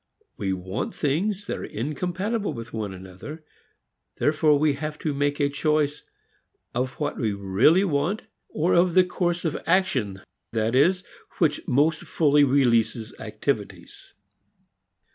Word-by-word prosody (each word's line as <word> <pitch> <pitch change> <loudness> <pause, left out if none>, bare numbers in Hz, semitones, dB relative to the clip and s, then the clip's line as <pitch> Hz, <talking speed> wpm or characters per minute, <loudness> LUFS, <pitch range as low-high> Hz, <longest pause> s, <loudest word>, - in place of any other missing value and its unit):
We 95 - -2
want 95 +1 -4
things 190 +8 -1
that - - -3
are - - -6
incompatible 180 - -2
with 115 -1 -8
one 110 -3 -3
another; 95 - -9 0.7
therefore 150 0 +3
we 150 0 +3
have 150 +2 -5
to 155 - -2
make 145 +1 0
a 145 - +3
choice 150 0 0 0.7
of 125 +1 -1
what 145 -1 -3
we 110 -4 0
really 100 - +3
want, 170 +4 0 0.3
of 175 +2 +3
the 185 - +7
course 175 -1 -1
of 160 - 0
action, 135 - +1 0.3
that 110 0 0
is, 180 +8 +3 0.3
which 155 -4 +2
most 150 +5 +2
fully 150 -2 +3
releases 115 -5 +2
activities. - - -4
145 Hz, 130 wpm, -25 LUFS, 120-165 Hz, 0.7 s, the